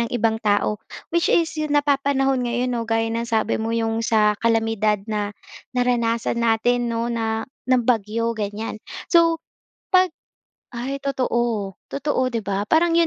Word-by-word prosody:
ng 235 - 0
ibang 225 0 +1
tao. 210 0 +1 0.3
Which 340 0 +2
is 335 -1 +3
yung 295 -1 0
napapanahon 275 -3 +2
ngayon 245 +1 -1
'no, 230 -1 -3
gaya 225 0 +1
ng 230 +1 -2
sabi 220 0 +1
mo, 225 +1 -1
'yung 225 0 0
sa 215 -2 +3
kalamidad 225 -3 +1
na 210 -2 -3 0.4
naranasan 235 -1 +1
natin 235 +1 +2
'no 230 +1 -1
na 225 -1 -1 0.2
ng 250 -2 +3
bagyo, 230 0 +1
ganyan. 215 0 -4 0.3
So 330 -1 +4 0.5
'pag 370 -2 +4 0.6
ay 265 +4 -3
totoo 240 -7 -1 0.2
totoo 275 -2 -1
'di 225 - -1
ba, 200 +1 -2
parang 335 +3 +3
yun 335 - +5
230 Hz, 150 wpm, -22 LUFS, 220-260 Hz, 0.6 s, yun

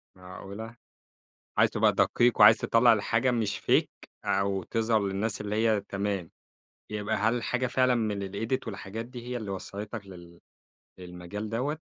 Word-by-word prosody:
معقولة! 100 +5 -9 0.8
عايز - - +5
تبقى - - +3
دقيق، 120 0 +2
وعايز 110 +2 +9
تطلَّع 115 +2 +4
الحاجة 115 +4 +1
مش 110 -4 -1
Fake - - 0 0.2
أو 100 -1 0
تظهر 110 +1 +1
للناس 100 +3 -2
اللي 105 0 -3
هي 110 -2 +2
تمام، 100 -3 -3 0.6
يبقى 105 0 -2
هل 110 +3 +1
الحاجة 125 +1 -1
فعلًا 130 0 +2
من 105 -4 -1
الEdit 115 +6 -3
والحاجات 105 +2 -6
دي 120 -1 -10
هي 125 0 -3
اللي 105 -4 -5
وصَّلتك 100 +3 -6
لل 85 -2 -13 0.6
للمجال 90 +4 -7
دوّة؟ 130 +8 -2
105 Hz, 145 wpm, -28 LUFS, 100-115 Hz, 0.8 s, وعايز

